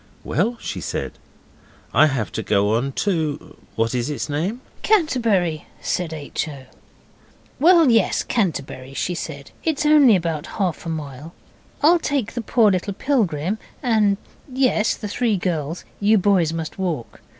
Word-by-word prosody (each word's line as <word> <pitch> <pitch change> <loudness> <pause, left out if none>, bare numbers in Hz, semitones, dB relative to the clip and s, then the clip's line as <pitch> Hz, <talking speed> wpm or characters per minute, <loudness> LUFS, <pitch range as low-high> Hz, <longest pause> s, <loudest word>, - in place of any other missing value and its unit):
'Well,' 220 - 0
she - - -5
said, - - -3 0.8
'I 155 - +6
have 130 -7 -2
to - - -3
go 105 +1 +2
on 125 +5 0
to 160 -5 -2 0.2
what 115 +1 0
is 125 +2 -1
its 150 +1 -3
name?' 175 +11 -2 0.2
'Canterbury,' 230 - +1
said 175 -3 -2
H. 155 0 -4
O. 140 -3 -9 0.9
'Well, 330 -2 +6
yes, 225 -4 +3
Canterbury,' 140 - -2
she 180 - -1
said; 145 -4 -6
'it's 315 -2 0
only 295 -7 +7
about 165 -3 -2
half 180 -5 -1
a - - -2
mile. 150 0 -6 0.5
I'll 340 +3 +6
take 275 -8 -1
the 240 - -3
poor 225 -2 +3
little 190 +1 -2
pilgrim 205 - 0 0.2
and, 215 -5 +3 0.3
yes, 250 -4 +2
the 215 - -6
three 220 0 0
girls. 165 -3 -3
You 210 +2 +4
boys 185 -5 +3
must 165 +2 -5
walk. 165 -11 -3
180 Hz, 150 wpm, -22 LUFS, 150-230 Hz, 0.9 s, only